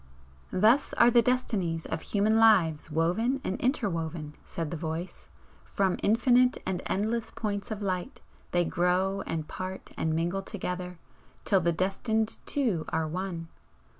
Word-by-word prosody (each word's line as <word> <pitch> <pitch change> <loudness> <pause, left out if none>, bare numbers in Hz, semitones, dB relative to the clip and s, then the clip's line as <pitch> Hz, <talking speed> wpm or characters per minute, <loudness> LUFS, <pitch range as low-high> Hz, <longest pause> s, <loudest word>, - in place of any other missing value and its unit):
"Thus 225 +9 +3
are 235 +1 +5
the 240 0 +6
destinies 210 -9 0
of 160 - -3
human 215 +2 +2
lives 180 -10 +4
woven 180 - +1
and 190 - -2
interwoven," 165 - -1
said 165 -3 -5
the - - -2
Voice 165 +2 -5 0.4
"From 190 -2 0
infinite 250 +4 +4
and 185 -1 -2
endless 220 +4 -1
points 205 -2 -4
of 215 -2 -4
light 185 -2 -3 0.3
they 175 -1 +2
grow 185 +3 +1
and 160 -2 -3
part 185 0 -6
and 160 0 0
mingle 175 +4 0
together, 180 -3 -5 0.5
till 195 -3 +3
the 170 0 +2
destined 215 +5 -1
two 230 - 0
are 160 -1 0
one. 170 0 -4
190 Hz, 140 wpm, -28 LUFS, 165-220 Hz, 0.5 s, the